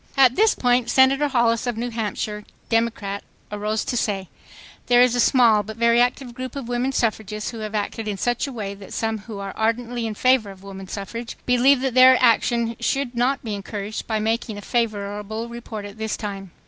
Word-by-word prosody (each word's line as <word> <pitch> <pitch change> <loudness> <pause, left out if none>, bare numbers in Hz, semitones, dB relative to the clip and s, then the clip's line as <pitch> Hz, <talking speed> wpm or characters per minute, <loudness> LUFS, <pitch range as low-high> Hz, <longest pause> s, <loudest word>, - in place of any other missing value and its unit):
." - - -23
At 250 - -9
this 440 +2 +4
point 245 -1 +2
Senator 270 +2 +4
Hollis 235 -3 +1
of 240 -2 -2
New 240 +1 -3
Hampshire, 210 -1 -3 0.3
Democrat, 225 -3 -1 0.3
arose 210 +1 -2
to - - -2
say: 195 -5 -1 0.6
"There 245 0 +5
is 250 -1 +3
a 245 - 0
small 235 -4 +5
but 215 +2 -9
very 235 +1 +4
active 250 0 0
group 255 +1 -6
of 275 -4 -5
women 245 +2 -1
suffragists 215 -4 -2
who 230 - -8
have 215 0 -5
acted 215 +1 -3
in 205 -2 -2
such 245 +6 0
a - - -6
way 210 -5 -5
that 200 -1 -11
some 225 -1 -1
who 215 0 -9
are 195 -1 -5
ardently 230 +1 -1
in 215 - -5
favor 255 -3 +3
of 195 -1 -12
woman 195 -1 -9
suffrage 225 +5 -6
believe 250 +2 +4
that 265 -2 -1
their 255 +1 +8
action 235 -1 +2
should 275 -2 -1
not 250 +3 0
be 220 -3 -4
encouraged 205 +1 -5
by 220 - 0
making 220 0 -1
a - - -7
favorable 215 -1 -2
report 235 -3 -7
at 205 +2 -10
this 220 -1 -2
time." 195 -2 -6
230 Hz, 205 wpm, -23 LUFS, 210-245 Hz, 0.6 s, their